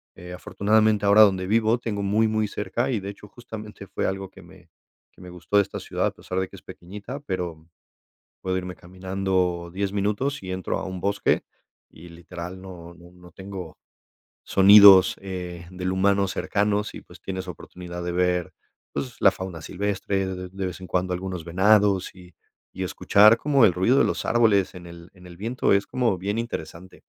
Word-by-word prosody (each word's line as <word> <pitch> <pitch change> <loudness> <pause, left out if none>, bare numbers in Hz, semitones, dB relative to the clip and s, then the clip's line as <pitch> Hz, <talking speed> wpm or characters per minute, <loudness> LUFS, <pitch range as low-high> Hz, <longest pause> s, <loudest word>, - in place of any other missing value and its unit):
eh, 90 0 -10
afortunadamente 105 +3 +1
ahora 100 +2 +6
donde 95 -3 +4
vivo 110 +3 +2
tengo 110 -4 -4
muy 105 +3 +2
muy 110 0 0
cerca 105 +5 -3
y, 120 -5 0
de 100 0 -6
hecho, 100 +1 -11
justamente 105 -2 -10
fue 95 - -3
algo 95 0 -4
que - - -15
me - - -18 0.4
que - - -19
me 90 - -10
gustó 90 +3 -2
de - - +7
esta - - -7
ciudad, - - -2
a - - -2
pesar 95 - -5
de 95 - -1
que - - -14
es - - -14
pequeñita, 105 +9 -9
pero 90 - -5 0.7
puedo 95 0 -1
irme 90 0 -5
caminando 95 -1 -2
10 100 +1 -2
minutos 105 +7 -1
y 95 - -6
entro 95 0 -3
a - - -5
un 95 -1 -6
bosque 100 +2 0 0.5
y 85 +2 -14
literal 85 +2 -9
no 90 -3 -11
no 85 0 -16
no 90 0 -16
tengo 95 -2 -9 0.7
sonidos, 100 -1 +8
eh, 90 -3 -7
del 90 0 -3
humano 100 +1 +2
cercanos 105 +2 -1
y - - -9
pues, - - -17
tienes 95 -1 -5
oportunidad 90 0 -8
de 90 - -3
ver, 90 -1 0 0.4
pues, 70 -2 -5
la - - +6
fauna 95 -3 -7
silvestre, 95 +2 -2
de 90 -1 -6
de 95 +1 -5
vez 90 - -6
en 95 - -8
cuando 90 0 -1
algunos 90 -2 -4
venados 95 +2 +2
y 90 -2 -16 0.4
y - - -6
escuchar 105 +3 +5
como 140 0 +3
el 95 - +5
ruido 95 +10 +3
de - - +5
los - - -2
árboles 110 -5 +2
en 90 -1 -10
el 85 0 -12
en 90 -1 -16
el 90 -1 -12
viento, 115 +7 0
es 100 +1 +1
como 120 -6 0
bien 100 +4 -3
interesante. 95 -5 -7
95 Hz, 190 wpm, -24 LUFS, 90-105 Hz, 0.7 s, sonidos